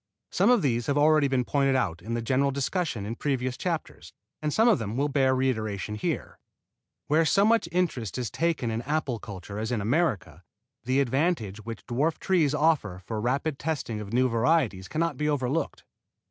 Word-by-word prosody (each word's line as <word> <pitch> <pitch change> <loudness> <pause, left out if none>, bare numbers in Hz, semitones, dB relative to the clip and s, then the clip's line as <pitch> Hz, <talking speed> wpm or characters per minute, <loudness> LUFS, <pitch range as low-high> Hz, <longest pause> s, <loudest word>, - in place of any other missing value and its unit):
Some 195 +5 +3
of 245 -5 +4
these 120 -4 0
have 140 - +1
already 150 0 +4
been 130 -2 0
pointed 135 0 +2
out 90 -10 -1
in 115 +5 -4
the 120 - -2
general 135 +4 +2
discussion 140 - -2
in 110 - -3
previous 130 -1 -2
chapters, 170 +1 -4 0.3
and 150 -1 -1
some 225 +9 +3
of 230 - +4
them 110 +1 -4
will 145 +2 +1
bear 135 -2 +2
reiteration 110 -6 -1
here. 105 - -3 0.7
Where 155 +3 +3
so 195 +5 +3
much 225 -6 +3
interest 160 - -1
is 125 -3 -3
taken 165 -8 0
in 110 +1 -2
apple 140 -3 -2
culture 100 0 -8
as 110 +2 -3
in 120 - 0
America, 105 - 0 0.4
the 130 +3 +2
advantage 130 - -1
which 115 -3 -7
dwarf 145 +8 0
trees 160 -7 +2
offer 145 - +1
for 110 - -4
the - - -2
rapid 135 +5 -1
testing 130 -9 -3
of 100 -1 -8
new 130 +2 +3
varieties 115 - +1
cannot 160 -2 -1
be 150 +2 0
overlooked. 145 +2 -1
130 Hz, 190 wpm, -27 LUFS, 115-155 Hz, 0.7 s, of